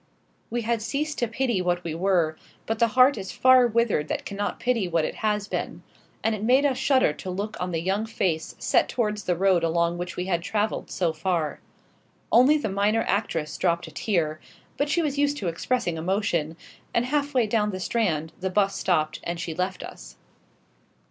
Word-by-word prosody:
We 240 0 -2
had 230 0 0
ceased 295 +7 -2
to 240 - +1
pity 235 -3 0
what 175 0 0
we 165 - -3
were, 170 -2 +1 0.3
but 225 0 -2
the 235 - +5
heart 255 -1 +6
is 190 -1 -6
far 255 -1 +5
withered 230 -9 +1
that - - -3
cannot 205 0 -3
pity 240 -6 0
what 165 -2 +1
it - - -3
has 210 -2 0
been; - - -4 0.4
and 225 - +2
it 215 - -4
made 260 +5 +4
us 265 -3 +1
shudder 265 - +3
to 185 - -8
look 200 +4 -3
on 180 - -2
the 165 -2 -1
young 200 +4 0
face 175 -7 -2
set - - +2
towards 210 -4 -1
the 180 - +1
road 185 -1 +3
along 170 +1 +1
which 175 0 -5
we 180 - -3
had 175 -3 0
travelled 210 +4 -2
so 175 -3 0
far. 165 -1 -1 0.7
Only 260 +6 +6
the 295 - -2
minor 205 +3 +1
actress 165 -6 -1
dropped 170 -2 +1
a 160 - -11
tear; 155 -3 -1 0.4
but 290 +1 -1
she 340 +3 +2
was 285 -2 -1
used 290 0 +2
to 190 - -3
expressing 175 +1 -1
emotion, 170 -3 -1 0.4
and 235 - +2
half 285 +1 -1
way 245 -3 +4
down 210 -1 +1
the 185 -2 -4
Strand 170 -7 -1
the 190 - -2
'bus 195 +1 +1
stopped 155 -4 0
and 170 0 -3
she 165 -1 -4
left 185 +3 -2
us. - - -10
200 Hz, 200 wpm, -25 LUFS, 170-235 Hz, 0.7 s, heart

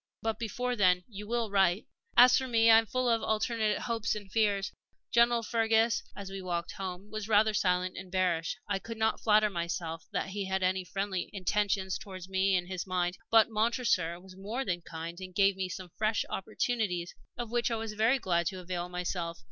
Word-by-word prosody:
But 225 0 -1
before 245 +2 -2
then 180 -4 +3
you 210 -2 -9
will 230 -2 -1
write? 195 -1 +3 0.3
"As 245 +1 +9
for 260 - 0
me, 230 -2 +5
I 225 - +9
am 225 - -3
full 255 +2 0
of 230 -1 +2
alternate 220 -1 0
hopes 230 -3 -1
and 205 -2 -8
fears. 205 -3 +1 0.4
General 235 0 +4
Fergus, 225 0 +2
as 195 -1 -7
we 195 0 -5
walked 175 -2 -3
home, 190 +1 -7
was 215 -1 -4
rather 215 0 +4
silent 180 -2 +1
and 185 -1 -8
bearish 180 -3 0
I 200 -1 -1
could 230 +3 -8
not 220 0 +1
flatter 215 -1 +4
myself 170 -2 -4
that - - -2
he 200 0 -3
had 190 0 -1
any 185 0 +1
friendly 195 0 -3
intentions 195 -1 0
towards 185 -3 -9
me 190 0 +2
in 175 - -2
his 185 0 -5
mind. 180 0 -1
But 225 0 +5
Montresor 215 -6 +1
was 185 0 -14
more 215 +7 -4
than 175 -4 -1
kind, 165 +1 -7
and 185 -1 -9
gave 195 -1 +4
me 190 -1 -3
some 185 -1 -7
fresh 215 0 +1
opportunities 200 -4 -2 0.2
of 235 -2 -5
which 240 +1 +1
I 230 - 0
was 225 -1 -4
very 225 +5 +3
glad 175 -7 0
to 185 - -3
avail 180 -1 -4
myself. 175 -1 -3
195 Hz, 200 wpm, -30 LUFS, 185-225 Hz, 0.4 s, As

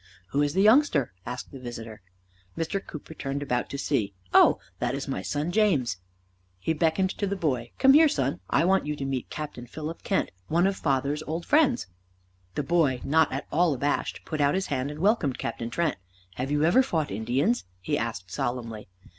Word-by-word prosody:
"Who 140 - +1
is 145 +2 0
the 190 - +4
youngster?" 215 - +4
asked 125 0 -6
the 135 - -9
visitor. 115 -3 -8 0.6
Mr. 165 +5 -2
Cooper 155 +1 -9
turned 140 -1 -3
about 125 -3 -1
to 140 - -4
see. 110 -9 -1 0.2
"Oh, - - +7 0.2
that's 130 +4 -2
my 135 - -2
son 150 +4 -2
James." 160 - +2 0.6
He 160 - -1
beckoned 165 +4 +1
to 205 - -2
the 200 - -1
boy. 130 -10 -1
"Come 270 0 +6
here, 310 +1 +7
son. 135 - -1
I - - +3
want 190 -4 +2
you 150 - -1
to 140 - -4
meet 135 -2 -3
Captain 145 -5 -6
Philip 160 +4 -6
Kent, 195 - 0 0.2
one 170 +3 +2
of 195 0 +2
father's 140 -1 0
old 165 +3 -3
friends." 285 -5 +3 0.7
The 150 - -1
boy, 145 -5 +2
not 160 +1 +3
at 135 - -3
all 165 -2 +3
abashed, 145 +3 -1
put 155 -2 -2
out 140 +3 +3
his 190 0 0
hand, 130 +1 -1
and 150 +1 -7
welcomed 195 - +2
Captain 115 0 -4
Kent. 160 +3 0 0.4
"Have 130 +7 -3
you 145 +1 +1
ever 175 +11 +5
fought 165 - -1
Indians?" 125 - 0
he 95 - -1
asked 105 -6 -3
solemnly. 115 0 -3
145 Hz, 190 wpm, -27 LUFS, 125-175 Hz, 0.7 s, Oh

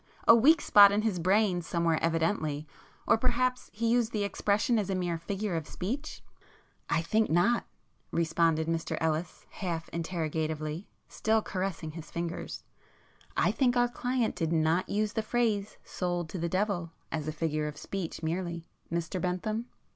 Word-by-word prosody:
—a - - +10
weak 295 +9 +6
spot 200 -1 +8
in 210 +1 +1
his 210 -6 0
brain 185 +1 +3
somewhere 165 -1 +1
evidently,—or 160 +1 -1
perhaps 250 +1 +1
he 230 +2 -2
used 235 -1 +2
the 210 -2 -1
expression 210 +4 +1
as 200 -2 -2
a 190 - 0
mere 175 -2 -1
figure 195 +2 -3
of 160 -3 -3
speech?" 265 +12 -5 0.7
"I 165 - +1
think 220 +6 +2
not;"—responded 165 -4 0
Mr 165 0 -1
Ellis 160 +1 -2
half 170 -4 -4
interrogatively, 160 -1 -3 0.2
still 220 0 +1
caressing 185 -4 -3
his 160 0 -9
fingers—"I 170 0 -4
think 250 -2 +2
our 245 0 +4
client 245 -1 -1
did 165 -1 -1
not 165 +3 +2
use 210 +1 0
the 220 - 0
phrase 215 -3 0
'sold 175 -2 -3
to 185 - -5
the 170 +1 -1
devil' 185 -2 0 0.2
as 155 -2 -3
a - - 0
figure 155 -1 -1
of 150 -1 -6
speech 180 -2 -5
merely, 170 0 -2 0.3
Mr 170 +2 -2
Bentham?" 215 +6 -2
180 Hz, 150 wpm, -30 LUFS, 165-215 Hz, 0.7 s, a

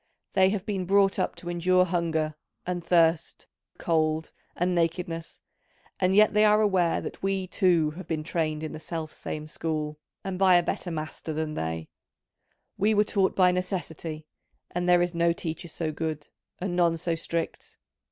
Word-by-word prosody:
They 190 0 +5
have 195 -1 -2
been 195 -4 -2
brought 195 +1 +3
up - - 0
to 175 - -7
endure 185 +1 +3
hunger 165 -3 0 0.3
and 175 -1 -3
thirst, 165 -1 +2 0.3
cold 160 -1 0 0.2
and 180 +1 +1
nakedness, 165 -1 -2 0.6
and 185 0 +2
yet 215 +1 +6
they 210 0 +5
are 210 0 +5
aware 190 -5 +2
that - - -7
we 195 -1 0
too 175 -5 +2
have 170 +2 -9
been 155 -2 -2
trained 155 -1 -1
in 155 - -4
the 155 - -7
self 160 -1 -5
same 155 0 -6
school 155 -1 -3 0.2
and 190 -1 -4
by 190 -2 +6
a 175 - +5
better 175 - -3
master 155 0 -5
than 155 0 -2
they: 80 - -3 0.9
we 215 +2 +3
were 210 - +5
taught 195 -2 +1
by 180 -1 +5
Necessity, 170 -4 -4 0.5
and 175 0 -1
there 175 0 +6
is 175 0 -2
no 170 0 +2
teacher 170 +1 -5
so 160 -1 -3
good, 155 -1 -4 0.3
and 180 -1 -3
none 170 -2 +3
so 165 +1 -1
strict. 165 0 -4
170 Hz, 170 wpm, -27 LUFS, 160-185 Hz, 0.9 s, yet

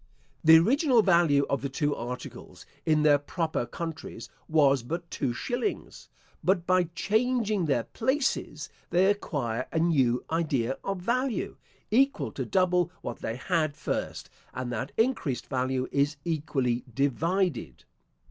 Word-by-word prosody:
The 160 +1 +9
original 250 - +4
value 170 -7 +4
of 140 - -1
the 140 - -3
two 145 +2 -1
articles 125 +1 -8 0.2
in 155 -1 +3
their 145 -1 +5
proper 155 -3 -2
countries 160 -9 -7 0.2
was 140 -4 +4
but 170 +7 -5
two 135 -4 -1
shillings; 245 - -4 0.3
but 180 -2 +2
by 185 0 +3
changing 220 -3 +1
their 135 -6 +1
places, 265 +4 -1 0.2
they 180 +2 +3
acquire 130 - -3
a - - -2
new 135 -8 +2
idea 140 -7 0
of 195 -2 -3
value, 245 +4 -1 0.4
equal 270 +5 +2
to - - -4
double 180 -3 +2
what - - -5
they 115 - -3
had 155 +1 -1
first, - - -4 0.2
and 130 -1 -4
that 120 +4 -3
increased 225 - 0
value 130 -1 -1
is 145 +1 +1
equally 135 -7 -1
divided. 140 - -1
160 Hz, 135 wpm, -28 LUFS, 135-190 Hz, 0.4 s, The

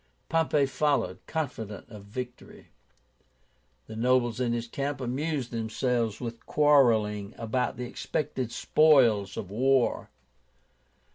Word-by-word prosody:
Pompey 160 -3 +2
followed, 145 +1 0
confident 115 -10 -4
of 105 -3 -12
victory. 125 +4 -8 1.2
The 110 - -9
nobles 120 0 +2
in 125 -2 0
his 120 0 -2
camp 140 +3 -3
amused 135 +1 -2
themselves 115 0 -1
with 115 -1 -7
quarrelling 115 -9 +3
about 120 +2 -1
the 125 - -4
expected 130 -1 -3
spoils 120 -11 +3
of 95 - -5
war. 130 +3 +1
125 Hz, 110 wpm, -28 LUFS, 115-140 Hz, 1.2 s, quarrelling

